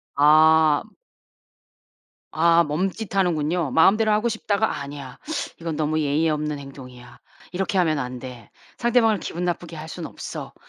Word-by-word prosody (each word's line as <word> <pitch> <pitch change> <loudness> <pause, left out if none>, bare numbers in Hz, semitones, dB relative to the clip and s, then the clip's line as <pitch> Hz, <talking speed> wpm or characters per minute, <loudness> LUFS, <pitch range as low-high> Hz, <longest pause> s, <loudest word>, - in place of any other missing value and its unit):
아. 155 +1 +5 1.5
아 170 +1 +4
멈칫하는군요. 175 - -1
마음대로 215 - +4
하고 215 +3 +2
싶다가 220 -1 -1
'아니야. 140 -2 -8 0.4
이건 165 -2 -4
너무 155 +1 0
예의 150 +2 +1
없는 150 -1 -2
행동이야. 125 -3 -12 0.3
이렇게 190 +2 -2
하면 160 -5 +2
안 125 -1 -5
돼. 125 -4 -10 0.3
상대방을 225 -4 +2
기분 175 +2 -5
나쁘게 175 -1 -3
할 155 +1 -8
순 175 - -6
없어.' - - -8
160 Hz, 290 characters per minute, -23 LUFS, 145-180 Hz, 1.5 s, 아